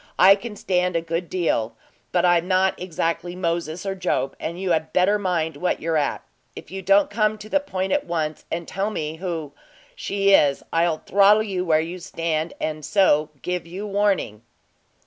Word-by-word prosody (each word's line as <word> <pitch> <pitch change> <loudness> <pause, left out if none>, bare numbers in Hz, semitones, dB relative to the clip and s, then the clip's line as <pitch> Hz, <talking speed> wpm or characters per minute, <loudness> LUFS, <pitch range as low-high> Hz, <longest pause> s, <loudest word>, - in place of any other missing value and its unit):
I 190 +2 +8
can 210 +2 -6
stand 180 -2 0
a 165 - +2
good 165 +1 -3
deal, 115 -11 -1 0.4
but 180 0 +2
I'm 175 0 +3
not 190 0 +3
exactly 170 0 -2
Moses 170 -1 -2
or 195 - -1
Job, 180 -7 -1
and 170 +2 -5
you 190 -1 -1
had 160 -1 0
better 200 +3 +3
mind 170 -5 -1
what 180 - -1
you're 165 0 -1
at. 150 -2 0 0.3
If - - -11
you 190 0 -5
don't 195 +2 +3
come 215 0 +1
to 210 - -10
the 290 - +2
point 190 -9 -3
at - - 0
once, 155 -3 -2
and 170 0 -3
tell 195 +2 -2
me 155 -6 -4
who 165 -5 -4
I - - -31 0.4
she 200 0 +1
is, 140 -7 +4
I'll 165 -1 +1
throttle 205 +2 +5
you 190 -4 -2
where 160 -3 +3
you 170 +3 -6
stand; 165 -1 -2
and 155 -1 -3
so 155 -6 +3
give 180 -1 -3
you 190 +5 -6
warning." 200 - 0
180 Hz, 190 wpm, -23 LUFS, 160-195 Hz, 0.4 s, I